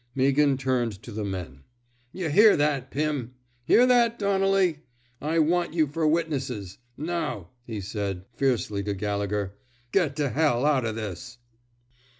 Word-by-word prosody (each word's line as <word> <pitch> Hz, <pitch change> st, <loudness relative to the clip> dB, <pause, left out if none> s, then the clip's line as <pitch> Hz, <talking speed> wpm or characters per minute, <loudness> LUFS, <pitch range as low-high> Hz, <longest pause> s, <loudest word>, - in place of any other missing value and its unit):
" -, -, -18 dB
Meaghan 140 Hz, +1 st, +3 dB
turned 125 Hz, -6 st, -1 dB
to 120 Hz, -, -9 dB
the 105 Hz, 0 st, -4 dB
men. 90 Hz, -9 st, -5 dB, 0.5 s
Y' 185 Hz, -3 st, -3 dB
hear 210 Hz, +8 st, +6 dB
that, 145 Hz, -3 st, 0 dB
Pimf 145 Hz, -4 st, -2 dB, 0.4 s
Hear 245 Hz, -, +6 dB
that, 240 Hz, -2 st, +3 dB
Donnelly! 195 Hz, -4 st, +2 dB, 0.4 s
I 160 Hz, +2 st, -1 dB
want 170 Hz, +1 st, +1 dB
you 160 Hz, -2 st, +4 dB
fer 155 Hz, +2 st, -1 dB
witnesses.... 135 Hz, -, -2 dB, 0.2 s
Now," 155 Hz, -, -3 dB, 0.2 s
he 110 Hz, -3 st, -4 dB
said, 100 Hz, -1 st, -4 dB
fiercely, 120 Hz, -6 st, 0 dB
to 100 Hz, 0 st, -3 dB
Gallegher, 100 Hz, 0 st, -2 dB, 0.4 s
get 165 Hz, -8 st, +1 dB
to 145 Hz, -2 st, 0 dB
hell 140 Hz, -1 st, +1 dB
out 140 Hz, -5 st, +2 dB
of 110 Hz, -1 st, -2 dB
this." 115 Hz, +4 st, -6 dB
135 Hz, 150 wpm, -26 LUFS, 105-160 Hz, 0.5 s, hear